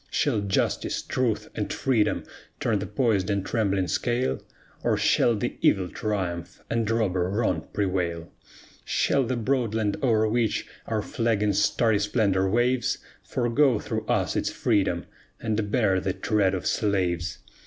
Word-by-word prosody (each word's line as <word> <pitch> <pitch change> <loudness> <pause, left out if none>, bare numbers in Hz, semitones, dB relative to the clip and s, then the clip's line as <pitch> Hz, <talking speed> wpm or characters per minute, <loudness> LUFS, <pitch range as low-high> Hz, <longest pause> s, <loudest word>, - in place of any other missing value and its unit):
Shall - - +1
Justice, 100 -1 0
Truth, - - -1
and - - -3
Freedom 120 -6 +1 0.4
turn 110 -3 +1
the 100 - -4
poised 110 -5 +1
and 100 -1 0
trembling 100 -5 0
scale? 120 +5 0 0.4
Or - - +2
shall 120 - +3
the 120 +4 -3
Evil 95 -3 +3
triumph, 90 -6 -3
and 115 -2 0
robber 95 -6 +1
Wrong 95 -6 0
prevail? 90 -4 -1 0.5
Shall 140 - +1
the 125 +2 -1
broad 120 -2 0
land 105 -2 0
o'er 110 -4 +3
which 115 0 0 0.2
our 110 -2 -1
flag 115 -2 0
in 105 -1 +2
starry 105 +2 +2
splendor 100 -3 +1
waves, 120 +4 +1 0.2
Forego 125 +1 +2
through - - -4
us - - +1
its - - 0
freedom, 95 -4 0 0.3
and 110 -2 -1
bear 105 -7 +3
the 95 0 -1
tread 100 -2 +1
of 90 - -4
slaves? 90 -5 0
105 Hz, 145 wpm, -26 LUFS, 95-115 Hz, 0.5 s, shall